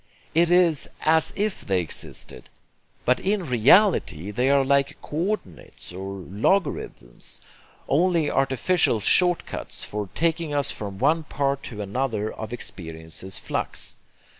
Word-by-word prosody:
It 170 +1 +3
is 175 -4 +3
AS 160 0 +3
IF 210 0 -1
they 95 -2 +2
existed; 85 -4 -6 0.6
but 125 +1 +3
in 195 -1 -1
reality 125 - +3
they 125 +6 +1
are 140 -1 +4
like 140 0 +1
co 180 +8 -1
ordinates 90 - -12
or 95 +2 -6
logarithms, 100 - -1 0.5
only 170 0 +2
artificial 135 0 +2
short 175 - +5
cuts - - -3
for 105 -2 -4
taking 165 -2 0
us 145 -2 +4
from 100 -2 -6
one 150 +8 +2
part 140 -1 -1
to 105 -3 -5
another 110 0 -2
of 110 0 -7
experience's 90 -5 -5
flux. - - -2
135 Hz, 130 wpm, -24 LUFS, 105-165 Hz, 0.6 s, short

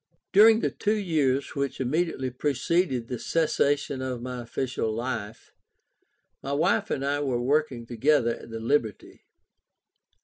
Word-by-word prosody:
During 220 +3 +7
the - - 0
two 210 +1 0
years 150 -9 0
which 140 -1 -2
immediately 130 -1 -1
preceded 140 0 0
the 125 -1 -4
cessation 145 -4 0
of 130 -2 -3
my 125 -1 -5
official 120 -1 -3
life, 115 -2 -5 0.9
my 140 - -4
wife 175 +8 +1
and 135 - -2
I 145 +1 0
were 130 -4 -1
working 130 -2 0
together 120 +1 +2
at - - -13
the 115 0 -6
"Liberty." 115 -2 -2
135 Hz, 135 wpm, -26 LUFS, 120-155 Hz, 0.9 s, During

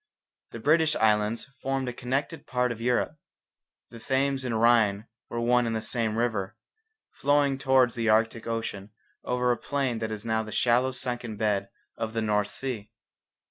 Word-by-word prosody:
The - - -8
British 155 0 +3
islands 110 +3 +1
formed 135 -1 -1
a 125 - -3
connected 135 +6 -3
part 125 -1 +1
of 115 -1 -6
Europe. 125 +5 0 0.7
The 115 - -10
Thames 135 +2 0
and 125 - -2
the - - +1
Rhine 110 -3 +3 0.2
were 120 - -3
one 120 0 +3
and 115 - -1
the 110 - -1
same 110 -1 -1
river, 110 -5 -1 0.5
flowing 140 -1 +2
towards 130 -3 +4
the 115 -2 -1
Arctic 115 +1 +2
ocean 110 -3 -3 0.3
over 125 0 +1
a 120 - +1
plain 135 -5 -1
that 110 0 -2
is 110 0 -6
now 110 -1 +1
the 110 -1 -7
shallow 125 +4 +2
sunken 120 -3 -4
bed 100 -2 0 0.3
of 110 0 -3
the 115 - -1
North 105 -1 +1
Sea. 115 -3 -5
120 Hz, 175 wpm, -27 LUFS, 110-130 Hz, 0.7 s, towards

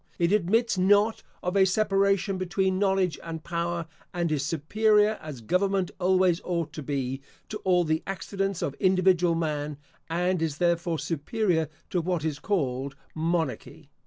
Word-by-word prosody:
It 170 +1 +2
admits 210 +2 +2
not 205 +4 +3 0.2
of 180 +2 -1
a 195 - +6
separation 195 -1 +2
between 185 +1 0
knowledge 190 -3 +1
and 160 -1 -6
power, 170 0 -2 0.3
and 170 -2 0
is 145 -3 0
superior, 210 +8 +2
as 150 -6 -8
government 185 - +1
always 185 -1 +3
ought 170 -4 -2
to 155 - -6
be, 135 -2 -3 0.3
to 215 - -5
all 180 -2 +3
the 160 0 0
accidents 195 0 -2
of 140 - -1
individual 185 -2 +3
man, 150 -3 -2 0.3
and 180 +1 0
is 155 -3 -1
therefore 170 -1 +1
superior 165 +1 -1 0.2
to 180 - +1
what 170 -2 -1
is 150 -2 -2
called 140 -8 -1 0.2
monarchy. 160 -2 -2
175 Hz, 150 wpm, -27 LUFS, 160-195 Hz, 0.3 s, a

